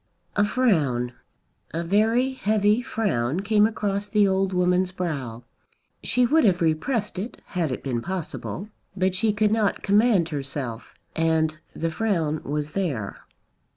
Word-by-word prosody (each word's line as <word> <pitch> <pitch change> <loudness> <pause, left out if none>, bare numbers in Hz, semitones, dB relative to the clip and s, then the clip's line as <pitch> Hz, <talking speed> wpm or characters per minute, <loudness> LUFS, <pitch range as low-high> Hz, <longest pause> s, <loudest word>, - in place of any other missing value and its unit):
A 205 - +4
frown, 155 - +1 0.6
a 170 - -1
very 220 +8 +2
heavy 215 -2 +2
frown, 180 - -1
came 210 +1 +4
across 205 -2 -2
the 210 -2 +4
old 190 0 +1
woman's 180 0 +2
brow. 140 -11 -4 0.6
She 250 0 +2
would 310 +6 +4
have 185 -5 +4
repressed 190 - 0
it 220 +6 -6
had 170 -7 -1
it - - -4
been 125 -4 -2
possible; 190 - -5 0.3
but 185 0 +2
she 215 +3 +2
could 210 0 +1
not 215 -3 +1
command 205 -4 +3
herself, 135 -5 -5 0.2
and 160 -1 +1 0.2
the 165 0 -2
frown 160 -6 0
was 150 +1 -3
there. 145 - -3
185 Hz, 140 wpm, -25 LUFS, 155-210 Hz, 0.6 s, A